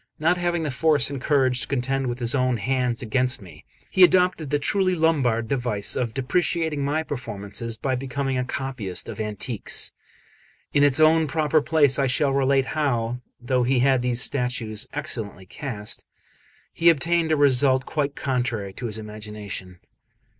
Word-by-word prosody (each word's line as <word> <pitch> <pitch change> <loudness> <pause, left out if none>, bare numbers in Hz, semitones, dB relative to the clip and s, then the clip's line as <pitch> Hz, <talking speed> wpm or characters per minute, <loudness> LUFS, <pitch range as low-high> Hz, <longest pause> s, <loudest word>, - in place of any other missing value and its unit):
Not 170 +3 +2
having 175 -1 0
the 150 - -2
force 145 +2 +2
and 140 -2 -5
courage 130 -4 +2
to 110 - -3
contend 135 0 -1
with 120 0 -3
his 120 -2 0
own 130 -3 +1
hands 125 +1 -1
against 125 +3 +1
me, 95 -4 -14 0.3
he 185 - +5
adopted 180 -4 +4
the 145 - +2
truly 185 +5 +1
Lombard 135 -9 +1
device 120 -6 0
of 120 -3 -2
depreciating 160 +2 0
my 150 +3 0
performances 115 -4 -5
by 130 +3 -2
becoming 135 +1 -2
a 125 - 0
copyist 125 -8 -4
of - - -7
antiques. 105 +1 -2 0.8
In 145 - +4
its 145 0 +4
own 160 0 +5
proper 155 +2 +1
place 145 -3 +3
I 135 - +2
shall 135 +2 +2
relate 135 0 +2
how, 125 -5 -1 0.2
though 125 +1 0
he 125 +1 +2
had 130 -1 +3
these 125 0 0
statues 125 -5 -2
excellently 115 -10 -4
cast, 105 0 -4 0.7
he 170 +1 +4
obtained 165 +1 +2
a 155 - +3
result 130 -2 +3
quite 145 -2 -2
contrary 120 -7 -2
to 120 - -5
his 110 -1 -3
imagination. 105 -4 -7
130 Hz, 160 wpm, -24 LUFS, 120-145 Hz, 0.8 s, he